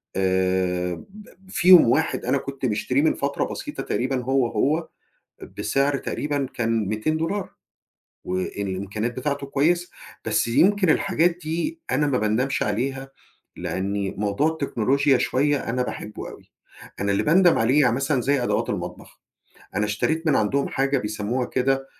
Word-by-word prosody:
آآ، 95 -1 +1 0.2
ب 210 +1 -13 0.2
فيهم 180 - +7
واحد 160 +6 +1
أنا 140 - +2
كنت 135 -1 -5
مشتريه 125 +5 +1
من 160 - +3
فترة 140 0 -1
بسيطة - - -6
تقريبًا 130 0 -1
هو، 135 -1 +2
هو 150 +9 0 0.7
بسعر 140 +1 +1
تقريبًا 145 -2 -2
كان 115 -3 0
200$، 160 - -1 0.7
والإمكانيات 100 +4 -3
بتاعتُه 140 +1 -2
كويسة. 170 +6 +1 0.4
بس - - +1
يمكِن 185 - +3
الحاجات 170 +2 +2
دي 170 - -3
أنا 145 +3 +2
ما 130 -3 +1
باندمش 110 +6 0
عليها، 135 +5 -2 0.5
لأني 100 +1 -2
موضوع 105 +8 +1
التكنولوجيا 140 -3 +1
شوية 140 0 0
أنا 125 +1 0
باحبُه 105 -3 -6
أوي، - - -15 0.5
أنا 100 0 +1
اللي 100 - +1
باندم 175 +3 +5
عليه 130 +6 +4
يعني 125 -3 +3
مثلًا 135 -1 0
زي 135 0 +1
أدوات - - 0
المطبخ، - - -6 0.6
أنا 105 - +2
اشتريت 160 +11 -1
من 140 - +4
عندهم 135 +7 +1
حاجة 135 0 0
بيسَمّوها 110 +3 -2
كده 135 +1 0
135 Hz, 140 wpm, -23 LUFS, 110-150 Hz, 0.7 s, فيهم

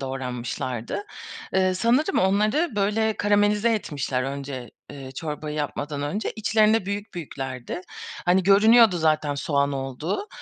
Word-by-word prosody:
doğranmışlardı. 125 - -4 0.5
Eee, 185 -1 +3
sanırım 245 - +2
onları 215 - +2
böyle 210 +2 +1
karamelize 205 +2 +2
etmişler 140 -9 -2
önce, 135 -2 -5 0.2
eee, 135 -2 -9
çorbayı 150 +1 -5
yapmadan 145 0 -3
önce. 200 +9 -2
İçlerinde 215 -1 +3
büyük 200 +1 -4
büyüklerdi. 135 -2 -5 0.4
Hani, 180 +2 +3
görünüyordu 210 +1 +6
zaten 155 -2 +1
soğan 140 0 0
olduğu 140 - -3
175 Hz, 115 wpm, -24 LUFS, 140-210 Hz, 0.5 s, görünüyordu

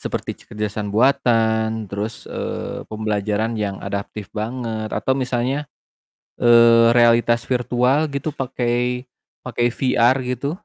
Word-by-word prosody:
Seperti - - -5
kecerdasan 105 0 -4
buatan, 110 -3 +2
terus, 105 +2 -5
eee, - - -5
pembelajaran 110 +1 -1
yang 100 -2 -2
adaptif 100 +1 -5
banget, 110 -1 -4
atau 130 - 0
misalnya, 130 +2 -1 0.7
eee, 115 -1 +6
realitas 120 0 +4
virtual 125 +3 +1
gitu 140 +2 -3
pakai 125 -1 -1 0.3
pakai 120 -1 -1
VR 125 0 +3
gitu. 125 +3 -3
120 Hz, 105 wpm, -21 LUFS, 110-125 Hz, 0.7 s, eee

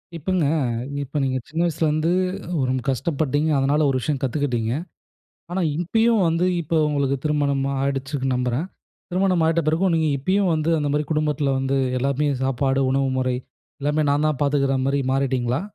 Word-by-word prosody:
இப்பங்க, 170 +1 0 0.6
இப்ப 140 +2 -3
நீங்க 130 -1 0
சின்ன 160 +3 -2
வயசுலேருந்து 160 0 +1 0.6
ரொம்ப 130 0 0
கஷ்டப்பட்டீங்க. 145 +1 0
அதனால 145 +3 +2
ஒரு 130 - +1
விஷயம் 145 +1 -1
கத்துக்கிட்டீங்க. 125 -4 -1 0.8
ஆனா, 185 +2 -1 0.2
இப்பயும் 225 +6 +2
வந்து 165 +2 +1 0.2
இப்ப 165 +1 -3
உங்களுக்கு 140 -2 0
திருமணம் 145 -2 +1 0.2
ஆயிடுச்சுன்னு 135 0 -1
நம்புறேன். 125 +5 -1 0.4
திருமணம் 185 -1 +2
ஆயிட்ட 165 +1 +2
பிறகும், 170 +4 +2
நீங்க 160 -1 +2
இப்பயும் 185 +6 +1
வந்து 155 +1 0
அந்த 145 -1 -1
மாரி 150 +1 +1
குடும்பத்தில 150 -2 0
வந்து 135 +1 0 0.2
எல்லாமே 140 +3 0 0.2
சாப்பாடு, 135 +1 +1
உணவு 135 0 +1
முறை 130 -1 0 0.4
எல்லாமே 150 +2 +1
நான் 145 +2 +2
தான் 155 -3 0
பார்த்துக்கிற 140 -1 +2
மாரி 140 +1 +1
மாறிட்டீங்களா? 130 -1 0
145 Hz, 150 wpm, -22 LUFS, 135-160 Hz, 0.8 s, அதனால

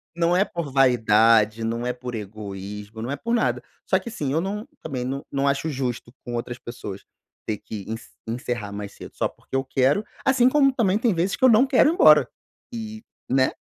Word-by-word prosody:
não 170 +1 +2
é 190 - +5
por 170 -7 -5
vaidade, 115 -3 +4
não 115 +2 -2
é 125 - 0
por 125 -1 -7
egoísmo, 105 0 -7
não 120 - -4
é 140 - -1
por 235 +9 -3
nada. 235 - +1 0.3
Só - - +5
que 235 - -6
assim, 150 - -3
eu 160 - +2
não 210 +6 -4
também 130 -5 -4
não 135 +2 -3
não 140 0 0
acho 140 +3 0
justo 125 -3 -4
com 120 - -5
outras 120 +1 -4
pessoas 100 -5 -8 0.4
ter 110 - -1
que 100 -1 -8
ence 115 +1 -6 0.2
encerrar 115 -2 -3
mais 100 0 -6
cedo - - -11
só - - 0
porque - - -10
eu 135 - +1
quero, 135 +8 +2 0.2
assim 260 -2 +4
como 275 0 +4
também 210 -6 +2
tem 230 -2 +2
vezes 175 +3 0
que - - -8
eu - - +8
não 230 +4 +6
quero 265 +2 +4
ir - - +1
embora 150 - +7 0.5
e 220 -1 -6 0.3
né. 130 0 +3
130 Hz, 210 wpm, -24 LUFS, -, 0.5 s, eu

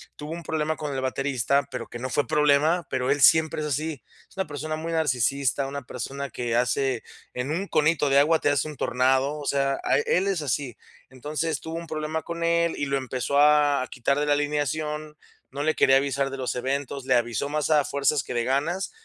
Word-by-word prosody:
tuvo 150 +1 -8
un 170 0 -7
problema 155 0 -1
con 150 -3 -5
el 130 - -2
baterista, 135 0 0
pero - - -5
que 120 - -8
no 130 +2 -4
fue 145 - +1
problema, 150 +3 +3
pero 130 0 -1
él 145 0 +1
siempre 160 +1 +5
es 150 - -2
así. 150 0 -3 0.3
Es - - -23
una 190 - 0
persona 150 +2 -4
muy 165 +2 -5
narcisista, 140 -2 +1
una 140 +1 -5
persona 135 +3 -5
que 120 0 -3
hace 125 0 +1 0.3
en 125 +3 -3
un 190 +5 -2
conito 155 -1 +2
de 140 +1 +5
agua 160 +3 +4
te - - +1
hace 145 +2 +1
un 150 - -7
tornado, 130 +3 +1
o 145 - -7
sea, 135 -1 +1
a - - +2
él 180 +6 +1
es 190 -5 0
así. 130 -2 -2 0.3
Entonces, 150 +5 -3
tuvo 160 0 -7
un 170 0 -7
problema 155 +1 -3
con 170 0 -5
él, 170 0 +2
y 145 - -1
lo 140 0 0
empezó 130 +2 -1
a 145 -2 +4
quitar 140 +3 0
de 150 - 0
la 145 - +4
alineación, 150 +1 -2 0.3
no 140 +2 -4
le 155 0 +1
quería 135 - +5
avisar 135 0 0
de 135 - -5
los 130 -1 -2
eventos, 135 +1 -3
le 130 - +2
avisó 120 +3 0
más 150 +1 -1
a 150 -2 +4
fuerzas 140 0 +1
que - - -6
de 120 -1 0
ganas, 150 +9 -1
145 Hz, 215 wpm, -25 LUFS, 135-155 Hz, 0.3 s, siempre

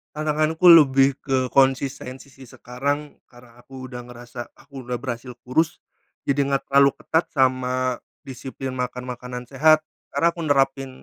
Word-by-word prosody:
Tantanganku 155 +2 0
lebih 135 -3 +6
ke 130 -2 -1
konsistensi 135 0 0
sih 135 -1 -14
sekarang, 140 +6 -4 0.2
karena 120 -1 -18
aku 130 0 -10
udah 125 -1 -8
ngerasa 120 0 -10
aku 140 -2 -11
udah 125 - -1
berhasil 120 0 -6
kurus 155 +6 0 0.5
jadi 140 0 +1
gak 140 -1 -1
terlalu 140 0 +5
ketat 160 +2 0
sama 130 -2 0 0.3
disiplin 130 0 -7
makan 125 0 -4
makanan 125 0 -6
sehat 155 +5 +4 0.3
karena 170 - +2
aku 170 - -7
nerapin, 135 -2 +1
135 Hz, 140 wpm, -23 LUFS, 125-140 Hz, 0.5 s, lebih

